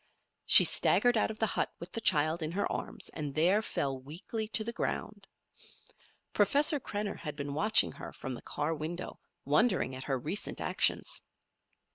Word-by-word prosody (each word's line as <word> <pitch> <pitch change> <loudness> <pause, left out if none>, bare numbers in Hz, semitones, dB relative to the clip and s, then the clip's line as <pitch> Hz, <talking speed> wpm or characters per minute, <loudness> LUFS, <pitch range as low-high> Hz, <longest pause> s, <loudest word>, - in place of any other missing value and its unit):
She - - +11
staggered 245 0 +3
out 220 - +1
of 220 - -7
the 220 - +1
hut - - -2
with 170 +2 -9
the 230 - -5
child 155 -2 +2
in 155 +1 -3
her 200 +2 -1
arms, - - -6
and 145 -3 -6
there 180 +7 +3
fell 135 -10 -3
weakly 175 - -6
to 220 0 +2
the 235 +2 -5
ground. - - -4 1.1
Professor 290 +1 +3
Krenner 205 -4 -5
had 150 -3 -6
been 140 -1 -5
watching 210 +9 +3
her - - -9
from 130 - -7
the 120 - -8
car 155 +3 -3
window, 160 +3 -6 0.3
wondering 150 - +1
at 130 0 -7
her 135 -2 -1
recent 155 - -4
actions. - - 0
170 Hz, 170 wpm, -30 LUFS, 145-215 Hz, 1.1 s, She